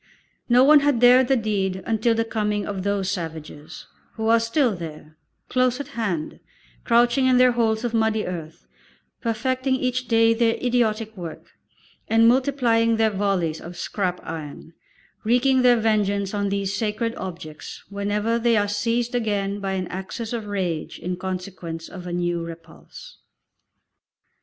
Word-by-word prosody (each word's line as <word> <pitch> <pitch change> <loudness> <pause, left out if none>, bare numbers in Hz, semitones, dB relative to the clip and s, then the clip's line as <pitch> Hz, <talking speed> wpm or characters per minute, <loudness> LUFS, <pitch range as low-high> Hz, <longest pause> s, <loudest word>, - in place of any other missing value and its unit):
No 245 +1 +6
one 295 +2 +7
had 285 -4 +1
dared 250 +1 +6
the 270 - +3
deed 195 -4 -1
until 225 +1 +1
the 225 0 0
coming 210 -2 -1
of 200 -2 -4
those 200 -1 -1
savages, 160 -5 -6 0.3
who 220 0 -2
are 230 0 +5
still 230 0 +1
there, 155 -2 -9 0.3
close 255 0 +1
at 285 0 -6
hand, 200 - -3 0.4
crouching 240 +2 +3
in 255 -1 +4
their 250 0 +6
holes 225 -2 0
of 240 -1 -2
muddy 220 -1 +1
earth, 160 - -7 0.6
perfecting 260 +3 0
each 255 -1 -2
day 230 0 +4
their 230 0 +2
idiotic 225 -3 0
work, 170 -4 -9 0.6
and 225 +1 +4
multiplying 235 -3 +2
their 220 -1 +3
volleys 190 -5 -1
of 175 +1 -9
scrap 180 -1 -2
iron, 160 0 -8 0.5
wreaking 250 +3 +3
their 245 -1 +5
vengeance 205 -3 0
on 200 -1 -1
these 200 0 -1
sacred 220 +2 -1
objects 170 -6 -8
whenever 205 +3 -1
they 230 -1 +3
are 205 0 +2
seized 230 +3 -1
again 205 -4 -1
by 195 -1 -3
an 185 -1 -2
access 205 +5 -5
of 225 -3 -4
rage 180 -6 -3
in 180 +1 -4
consequence 185 -3 -6
of 180 -1 -9
a - - -5
new 175 -1 -1
repulse. 165 - -12
215 Hz, 150 wpm, -23 LUFS, 185-235 Hz, 0.6 s, one